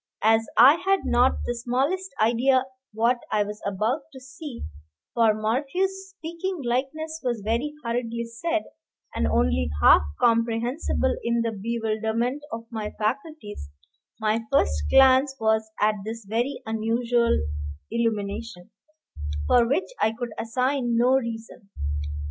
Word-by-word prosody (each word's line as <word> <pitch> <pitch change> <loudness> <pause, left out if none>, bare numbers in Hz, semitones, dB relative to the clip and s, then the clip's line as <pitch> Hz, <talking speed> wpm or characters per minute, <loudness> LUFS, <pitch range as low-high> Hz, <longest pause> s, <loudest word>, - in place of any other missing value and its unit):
As 225 +1 +4
I 270 +7 +8
had 390 0 +2
not 250 +2 +4
the 240 - -1
smallest 270 +11 -1
idea 250 +4 +3 0.3
what 230 +3 +2
I 210 -1 +3
was 210 +1 -7
about 215 +9 0
to 265 - -10
see, 265 0 -9 0.5
for 225 -2 +4
Morphew's 300 - -1
"speaking 360 0 -5
likeness" 310 +6 -2
was 240 -5 -2
very 240 +7 -1
hurriedly 235 0 -2
said, 320 +9 -2 0.5
and 75 0 0
only 80 +1 +1
half 75 - +7 0.2
comprehensible 235 +4 +1
in 235 0 +1
the 230 - -1
bewilderment 225 +4 -1
of 230 0 -5
my 215 -2 -3
faculties, 220 - -4 0.5
my 220 +1 +1
first 75 - +3 0.2
glance 265 +1 +6
was 220 0 +1
at 215 +1 +4
this 225 0 -6
very 245 +5 -1
unusual 230 +2 +1 0.5
illumination, 215 -3 -2 0.7
for 235 - +4
which 285 - 0
I 220 - +2
could 240 +1 -5
assign 250 +1 0
no 240 +2 +4
reason. 230 -5 -2
235 Hz, 125 wpm, -25 LUFS, 220-265 Hz, 0.7 s, I